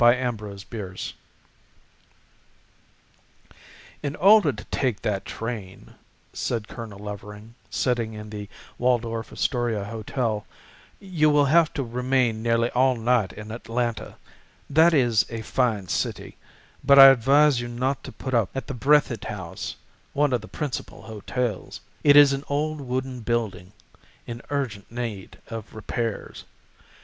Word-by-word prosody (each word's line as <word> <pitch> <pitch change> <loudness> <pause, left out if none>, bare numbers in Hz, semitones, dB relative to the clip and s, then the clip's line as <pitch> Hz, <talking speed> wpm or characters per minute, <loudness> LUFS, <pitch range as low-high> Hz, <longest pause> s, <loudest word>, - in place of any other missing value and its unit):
THE 120 +1 +6
OTHER 105 -3 -4
LODGERS 95 -2 -7 2.9
"IN 145 -1 -3
order 200 -4 +6
to 105 - -9
take 125 -6 -1
that 100 -2 -1
train," 110 -5 -6 0.4
said 115 -3 -2
Colonel 110 -4 -8
Levering, 105 +2 -9 0.2
sitting 120 -3 0
in 105 0 -8
the 105 -1 -7 0.3
Waldorf 115 -2 0
Astoria 120 -5 -1
hotel, 110 0 -3 0.5
"you 170 -6 +1
will 145 -1 +4
have 160 +3 +4
to 140 - -1
remain 125 -1 0
nearly 115 0 +1
all 130 +1 +3
night 115 -4 +1
in 105 0 -9
Atlanta. 115 0 -3 0.5
That 160 +3 +5
is 120 -7 +4
a 115 -1 -5
fine 110 -6 0
city, - - -3 0.5
but 140 0 +6
I 135 - +12
advise 135 +1 +4
you 120 - -4
not 125 +2 -2
to - - -8
put 130 - -6
up 115 -5 +2
at 135 - -3
the - - -5
Breathitt 130 -2 +2
House, 95 -5 -6 0.4
one 145 -2 +2
of 120 - +1
the 110 - -10
principal 145 0 -5
hotels. 110 0 -4 0.2
It 145 -1 +7
is 145 -1 +8
an 135 +1 -3
old 150 +1 -1
wooden 130 0 -3
building 110 -6 -2 0.5
in 120 0 -7
urgent 125 -9 -3
need 115 -5 -5
of 115 -2 -7
repairs. 110 +1 -4
120 Hz, 135 wpm, -25 LUFS, 110-135 Hz, 2.9 s, I